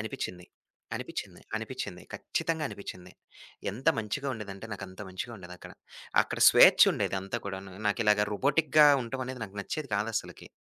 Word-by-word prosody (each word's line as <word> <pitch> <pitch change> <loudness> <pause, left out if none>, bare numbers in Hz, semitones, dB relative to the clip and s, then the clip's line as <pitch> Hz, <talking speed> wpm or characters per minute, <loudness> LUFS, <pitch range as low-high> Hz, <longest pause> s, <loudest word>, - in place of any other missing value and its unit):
అనిపిచ్చింది. 90 -4 -5 0.5
అనిపిచ్చింది. - - -6 0.2
అనిపిచ్చింది. - - -5
ఖచ్చితంగా 160 -2 -2
అనిపిచ్చింది. 90 -2 -9 0.6
ఎంత 120 +9 -10
మంచిగా 110 +6 -3
ఉండేదంటే 105 -2 -7
నాకంత 95 -1 -8
మంచిగా 95 +6 -6
ఉండేదక్కడ. 90 -1 -11 0.5
అక్కడ - - -5
స్వేచ్చుండేదంతా 95 +4 +5
కూడాను, 95 -1 -6
నాకిలాగ 105 -1 +3
రోబోటిక్‌గా 150 +6 +4 0.2
ఉండటం 130 +2 -4
అనేది 130 -2 -6
నాకు 100 -1 -10
నచ్చేది 150 +6 -5
కాదసలకి. 105 +2 -3
105 Hz, 120 wpm, -29 LUFS, 95-130 Hz, 0.6 s, స్వేచ్చుండేదంతా